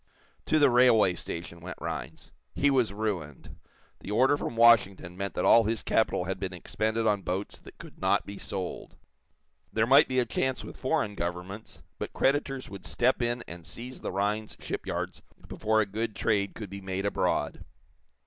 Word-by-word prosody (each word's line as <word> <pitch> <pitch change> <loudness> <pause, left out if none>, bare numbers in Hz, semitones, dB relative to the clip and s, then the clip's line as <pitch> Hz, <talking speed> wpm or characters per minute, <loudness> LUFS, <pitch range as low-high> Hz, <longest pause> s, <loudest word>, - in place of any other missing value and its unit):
To 155 - +3
the 145 -4 +5
railway 120 -6 +5
station 85 0 -6
went 90 +2 -8
Rhinds. - - -6 0.2
He 145 0 +3
was 125 -6 +2
ruined. 100 -9 -4 0.4
The - - -9
order 130 +7 +4
from 120 - -4
Washington 100 -6 +4
meant 100 0 -4
that - - 0
all 115 -1 +7
his 110 +1 -1
capital 110 -5 +1
had 95 +1 -3
been 95 -1 -3
expended 110 +5 -2
on 105 -2 +2
boats 95 +2 -4
that - - -15
could - - -13
not - - +2
be 100 0 -8
sold. 95 -2 -5 0.8
There 110 0 +2
might 135 +5 +7
be 130 - -2
a 125 - +3
chance 130 +3 -1
with - - -9
foreign 130 -6 0
governments, 90 +3 -6 0.2
but - - -5
creditors 135 -1 0
would 100 0 -9
step 125 +1 +1
in 120 0 -1
and 85 -1 -9
seize 125 +9 -8
the - - -3
Rhinds 105 +2 -1
shipyards - - -4 0.3
before 110 0 +1
a - - +1
good 110 +2 -3
trade 100 -1 0
could 105 -4 -7
be 100 0 -7
made 95 +1 -3
abroad. 100 - 0
105 Hz, 175 wpm, -28 LUFS, 95-120 Hz, 0.8 s, all